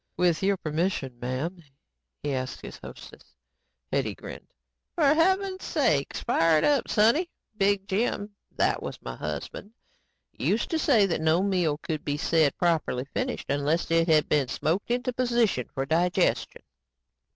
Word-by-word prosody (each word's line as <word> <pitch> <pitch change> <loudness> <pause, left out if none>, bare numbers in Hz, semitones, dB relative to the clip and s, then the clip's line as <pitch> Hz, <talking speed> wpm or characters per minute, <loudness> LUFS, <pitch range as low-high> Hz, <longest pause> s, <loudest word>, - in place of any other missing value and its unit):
"With 175 -3 +2
your 195 0 +2
permission, 155 -6 -2
m'am," 135 +9 -3 0.6
he 145 - -1
asked 130 -1 -4
his - - -9
hostess. - - -12 0.6
Hetty - - 0
grinned. - - -10 0.5
"For - - +2
heaven's 375 +3 +1
sake, 155 - +1
fire 165 -1 +3
it - - +1
up, 285 -4 +2
sonny. 235 - +3 0.3
Big 200 -1 +1
Jim 205 0 -1 0.2
that - - +1
was - - -6
my 60 - -6
husband 75 - -6 0.6
used - - -1
to 325 - +1
say 235 -10 +4
that 170 -4 -1
no 160 +3 +3
meal 180 -7 +1
could 155 -1 -4
be 145 0 -2
said 160 -2 +2
properly 160 -7 0
finished 255 0 -2
unless 145 +4 0
it 165 0 +3
had 155 -2 +4
been 145 -3 +2
smoked 165 - -1
into 250 +1 -1
position 235 - +1
for 135 - -3
digestion." 170 +4 0
170 Hz, 150 wpm, -27 LUFS, 150-220 Hz, 0.6 s, say